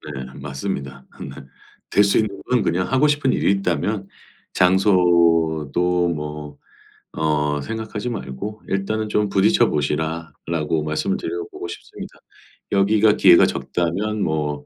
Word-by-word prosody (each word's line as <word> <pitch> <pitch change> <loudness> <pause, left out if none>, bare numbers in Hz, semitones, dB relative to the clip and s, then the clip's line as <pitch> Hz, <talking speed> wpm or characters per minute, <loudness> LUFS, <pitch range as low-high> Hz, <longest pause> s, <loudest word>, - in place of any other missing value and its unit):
네. 65 -1 -5
맞습니다. 70 -1 -5
네. - - -6 0.6
될 100 - +4
수 100 - +2
있는 105 -3 -1
건 125 -3 +3
그냥 90 +5 -1
하고 135 +3 +4
싶은 145 -3 +1
일이 - - +2
있다면 100 0 -1 0.5
장소도 85 -2 +3
뭐 75 -2 -5 0.6
어 75 -2 0
생각하지 110 - -5
말고 105 - -6
'일단은 105 +3 -1
좀 105 -1 0
부딪혀 95 +1 +3
보시라.'라고 80 +1 -2
말씀을 75 0 -1
드려보고 85 0 -5
싶습니다. - - -10 0.5
여기가 105 +2 +4
기회가 90 -4 +6
적다면 100 +5 -2
뭐 75 -3 -2
85 Hz, 270 characters per minute, -21 LUFS, 75-105 Hz, 0.6 s, 기회가